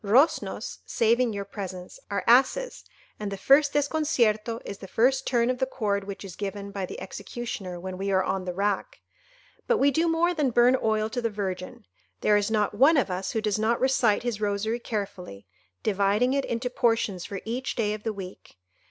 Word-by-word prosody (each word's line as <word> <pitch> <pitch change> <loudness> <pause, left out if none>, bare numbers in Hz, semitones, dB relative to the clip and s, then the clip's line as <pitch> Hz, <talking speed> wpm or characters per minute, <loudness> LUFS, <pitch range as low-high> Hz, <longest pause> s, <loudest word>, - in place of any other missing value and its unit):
Roznos—saving 235 -1 +2
your 200 -1 -4
presence—are 190 0 -6
asses, 270 - +3 0.4
and 210 -1 -4
the 195 - -4
first 285 +6 +4
desconcierto 245 -7 +1
is 200 - -7
the 195 - -9
first 250 +7 +2
turn 240 -1 +2
of 250 - -4
the 260 - +1
cord 200 -6 -1
which 200 0 -7
is 185 -2 -9
given 200 0 -5
by 195 -2 -4
the - - -7
executioner 195 -5 -6
when 185 +1 -6
we 195 +1 -2
are 190 -1 +3
on 190 -1 -2
the 180 - -3
rack. 200 0 -1 0.7
But 480 - +3
we 280 +1 +4
do 325 +5 +1
more 335 +2 +2
than 300 -5 +1
burn 240 +2 +5
oil 215 -1 +1
to 245 - -2
the 230 - 0
Virgin. 190 -3 -5 0.4
There 210 - +4
is 205 0 +2
not 210 -2 +1
one 275 +9 +5
of 250 -8 +1
us 185 +1 -3
who 220 - 0
does 215 -1 0
not 225 +2 +1
recite 250 -5 +2
his 235 -4 -3
rosary 210 +3 -1
carefully, 195 - -5 0.4
dividing 210 +5 +2
it 275 -1 0
into 240 +2 -2
portions 225 -7 +1
for 195 - -5
each 245 +4 -3
day 210 -3 0
of 215 - -6
the 220 - -2
week. 190 - -10
215 Hz, 190 wpm, -26 LUFS, 200-250 Hz, 0.7 s, burn